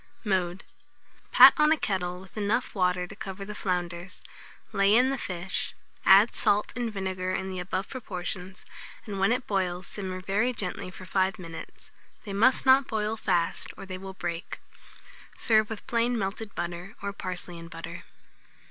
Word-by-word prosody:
Mode. 190 -3 0 0.7
Pat - - +10
on 300 0 +5
a 320 - +5
kettle 180 -6 -2
with 190 0 -15
enough 215 +4 0
water 180 -3 +1
to 190 - -11
cover 195 -1 -6
the 210 - -6
flounders, 180 -2 -3 0.5
lay 200 +1 +4
in 255 +3 +5
the - - 0
fish, 180 -1 -3 0.3
add 200 +4 +8
salt 205 +1 +2
and 240 -2 -2
vinegar 190 -2 -2
in 190 0 -2
the 185 - -4
above 185 +2 -2
proportions, 185 -5 -6 0.4
and 200 -3 -5
when 195 +3 +3
it 250 +1 0
boils, 185 -2 -1
simmer 185 -2 -5
very 205 +7 +1
gently 185 -4 -4
for 185 0 -11
5 190 0 +1
minutes. 165 -3 -10 0.3
They 200 - -6
must 235 +6 +4
not 265 +1 +6
boil 215 0 -1
fast, 170 -6 0
or 195 - -8
they 185 -1 -6
will 190 0 -8
break. 175 -2 -4 0.8
Serve 215 -2 +3
with 220 -2 -6
plain 235 +1 +1
melted 205 +1 -3
butter, 175 +3 -5
or 200 0 -2
parsley 180 -2 -5
and 165 0 -10
butter. - - -8
190 Hz, 165 wpm, -28 LUFS, 180-215 Hz, 0.8 s, Pat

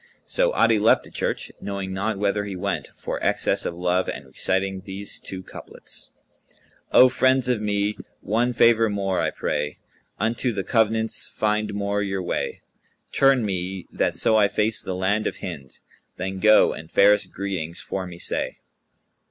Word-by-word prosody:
So - - +1
Adi 110 - +4
left 110 +2 +4
the - - -13
church, - - -2
knowing 100 -1 -4
not 100 +2 -1
whither 105 +1 0
he 100 -2 -5
went, 100 +1 -2
for - - -5
excess - - +1
of 85 - -4
love, 90 +1 0
and 70 - -5
reciting 95 +8 -1
these 100 +1 -4
two 95 -1 -7
couplets, - - -10 0.8
"O 130 - +8
friends 130 0 +2
of 125 -4 +1
me, 105 0 0 0.2
one 115 +5 0
favour 115 -1 +4
more 100 -2 -1
I - - +1
pray: 75 0 -3 0.2
* - - -40
Unto 120 +2 0
the 100 -2 -2
convents[FN#180] 110 0 +1
find 105 -1 0
more 100 0 -1
your 95 -2 -2
way: 85 - -3 0.5
Turn 135 -4 +4
me 95 -1 -3
that - - 0
so 110 - +3
I 105 -1 +5
face 105 +1 +1
the 95 - -4
land 100 +4 0
of - - -4
Hind; 70 -8 -7 0.2
* - - -38
Then 95 +1 -4
go, 110 +2 +6
and 80 - -10
fairest 105 +1 +4
greetings 90 -4 -4
for 95 -1 -4
me 85 -1 -9
say." - - -3
100 Hz, 170 wpm, -24 LUFS, 95-110 Hz, 0.8 s, O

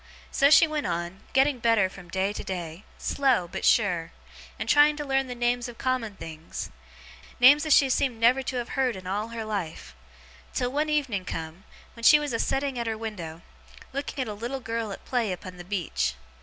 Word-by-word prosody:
So 280 - +4
she 300 +2 +8
went 305 -5 -2
on, 175 +2 -3
getting 270 0 +3
better 230 -4 +3
from 185 -2 -13
day 190 +3 0
to - - -6
day, 175 0 -6
slow, 260 -10 +1
but - - -6
sure, 175 -7 +2 0.5
and - - -4
trying 295 +1 +6
to 295 - -4
learn 270 -1 +1
the 250 - -5
names 240 0 0
of 240 -2 -10
common 255 -5 -1
things 160 -2 -7 0.7
names 290 +5 +7
as 305 - +6
she 275 - +5
seemed 255 -2 0
never 245 +4 +4
to 260 0 -4
have 240 -1 -3
heerd 260 -3 0
in 185 -1 -9
all 205 +4 -2
her 230 -1 -5
life 170 - -5 0.6
till 250 -1 0
one 300 +3 0
evening 270 -11 0
come, 165 +2 -6 0.3
when 230 - -11
she 300 - +8
was 295 -3 -3
a 230 - 0
setting 270 -2 -1
at 235 - -2
her 220 -1 -2
window, 175 -7 -6 0.5
looking 280 +1 -4
at - - -8
a 210 - -4
little 240 +6 -4
girl 230 -3 -3
at - - -9
play 240 -5 0
upon 180 0 -7
the 175 - -8
beach. 175 - -2
230 Hz, 205 wpm, -26 LUFS, 185-270 Hz, 0.7 s, she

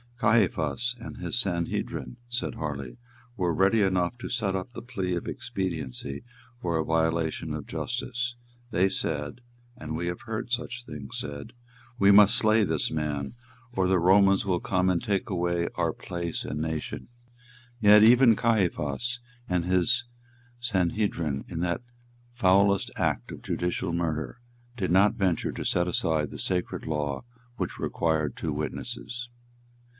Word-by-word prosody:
"Caiaphas 110 - +2
and 115 - -8
his - - -2
Sanhedrim," 90 +3 -2
said 120 +2 -2
Harley, 70 -5 -5 0.4
"were 90 -3 +1
ready 95 +6 +3
enough 95 +3 +1
to - - -6
set 105 -6 0
up 95 +5 -4
the - - -7
plea 95 -7 -2
of 85 - -4
expediency 75 -7 -4 0.4
for 85 -5 -1
a 80 - 0
violation 80 0 0
of - - -5
justice; 120 -1 -3 0.3
they 95 -4 +3
said, 80 +3 -3 0.4
and 80 0 -5
we 85 +2 -2
have 85 0 -3
heard 120 +1 -5
such 125 0 -2
things 70 - -7
said, 70 -1 -6 0.4
'We 100 -3 +6
must 100 0 +8
slay 110 0 +4
this 80 -5 0
man, 75 -1 -2 0.4
or 95 -5 +2
the 95 -1 +3
Romans 95 +3 +5
will 90 -3 +1
come 95 +1 +1
and 90 -2 +1
take 100 +2 -1
away 85 -2 0
our - - 0
place 85 -2 -4
and 75 - -3
nation.' 80 -1 -4 0.7
Yet 105 -1 +8
even 120 0 +7
Caiaphas 110 - +1 0.3
and 90 -2 +1
his 95 +7 +2 0.5
Sanhedrim, 95 - 0
in 85 -2 -4
that 85 +3 0 0.5
foulest 100 -3 +3
act - - -1
of - - -8
judicial 90 -1 -2
murder, 85 +5 -2 0.4
did 95 -6 -1
not 100 +4 +5
venture 95 -7 0
to - - -6
set 90 0 +2
aside 80 -3 +1
the - - -7
sacred 90 -1 -1
law 75 -1 -2 0.3
which - - -3
required 80 -4 0
two 80 - -3
witnesses." 120 +10 -4
90 Hz, 145 wpm, -27 LUFS, 80-110 Hz, 0.7 s, must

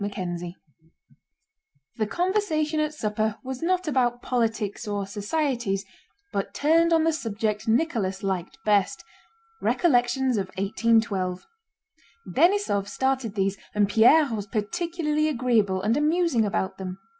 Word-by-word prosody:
CHAPTER 185 -4 -3
XV 175 +1 -6 1.5
The 215 - 0
conversation 330 - 0
at 305 0 0
supper 215 -3 -1
was 260 -1 -6
not 365 +1 0
about 245 -4 +1
politics 225 -3 -1
or 205 -1 -2
societies, 210 -1 -2 0.5
but 200 - -3
turned 330 +3 +3
on 325 -1 +4
the 325 0 +2
subject 215 -6 -2
Nicholas 225 -7 0
liked 190 -2 -3
best—recollections 265 - 0
of 195 -2 -1
1812. 195 -2 0 0.8
Denísov 330 - +2
started 260 -2 -1
these 195 0 0 0.2
and 205 -1 +3
Pierre 240 +6 +5
was 205 -2 -4
particularly 305 - -1
agreeable 230 -9 +1
and 220 +3 +2
amusing 300 -5 +2
about 190 -1 -2
them. 185 -1 -5
230 Hz, 120 wpm, -25 LUFS, 200-305 Hz, 1.5 s, Pierre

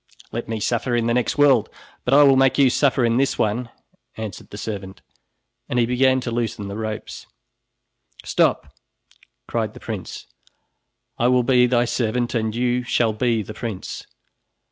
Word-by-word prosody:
"Let 115 0 -5
me 110 -1 -2
suffer 120 +3 -1
in 120 -1 +1
the 120 - +1
next 125 +3 0
world, 140 -6 +4 0.4
but 125 - +1
I 145 - +8
will 135 -1 +6
make 135 0 +3
you 135 -3 +5
suffer 130 -2 +2
in 115 0 +2
this 135 +1 +1
one," 115 +3 -1 0.5
answered 110 -4 -7
the 105 - -9
servant 100 -3 -6 0.7
and 125 - -1
he 120 - +4
began 130 +2 +2
to 120 - -4
loosen 115 -3 -3
the 100 - -6
ropes. 110 0 -6 1.0
"Stop!" - - +1 0.7
cried - - -2
the - - -10
prince, - - -7 0.9
"I 120 - +3
will 125 0 +3
be 125 0 +4
thy 120 -1 +2
servant 120 0 -1
and 110 -2 -1
you 125 +1 +1
shall 120 -2 +1
be 115 0 0
the 110 - -8
prince. 110 -5 -6
120 Hz, 165 wpm, -22 LUFS, 110-125 Hz, 1.0 s, I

